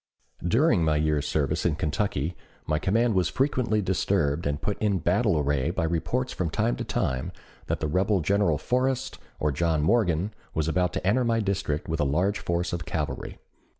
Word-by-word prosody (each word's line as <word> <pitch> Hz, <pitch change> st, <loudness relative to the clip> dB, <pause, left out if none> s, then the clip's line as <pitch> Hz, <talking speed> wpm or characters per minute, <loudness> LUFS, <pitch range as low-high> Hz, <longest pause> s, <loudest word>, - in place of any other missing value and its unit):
During 110 Hz, -, +3 dB
my 80 Hz, -1 st, +2 dB
year's 75 Hz, -1 st, +1 dB
service 80 Hz, +2 st, 0 dB
in 85 Hz, -4 st, +1 dB
Kentucky 80 Hz, 0 st, -1 dB, 0.3 s
my 75 Hz, 0 st, 0 dB
command 115 Hz, +6 st, +2 dB
was 90 Hz, -3 st, +2 dB
frequently 115 Hz, -1 st, +1 dB
disturbed 90 Hz, -5 st, 0 dB
and 70 Hz, 0 st, -1 dB
put 105 Hz, -, -3 dB
in 105 Hz, -3 st, +1 dB
battle 80 Hz, -1 st, +2 dB
array 75 Hz, 0 st, +1 dB
by 85 Hz, 0 st, -1 dB
reports 85 Hz, +11 st, -1 dB
from 90 Hz, -3 st, -2 dB
time -, -, 0 dB
to -, -, -3 dB
time 65 Hz, -1 st, -1 dB, 0.4 s
that -, -, -2 dB
the 75 Hz, -, 0 dB
rebel 95 Hz, +6 st, +2 dB
General 95 Hz, -2 st, +2 dB
Forrest 130 Hz, -, -1 dB, 0.2 s
or 75 Hz, -, +1 dB
John 80 Hz, +1 st, +1 dB
Morgan 95 Hz, 0 st, +2 dB, 0.2 s
was 80 Hz, -1 st, 0 dB
about 90 Hz, +1 st, +1 dB
to -, -, -3 dB
enter 120 Hz, +7 st, +3 dB
my 115 Hz, -1 st, +1 dB
district 95 Hz, -8 st, -1 dB
with 80 Hz, 0 st, -2 dB
a -, -, +3 dB
large 90 Hz, +9 st, +1 dB
force 85 Hz, 0 st, -1 dB
of 85 Hz, -1 st, -2 dB
cavalry. 75 Hz, -2 st, -4 dB
85 Hz, 185 wpm, -26 LUFS, 75-105 Hz, 0.4 s, During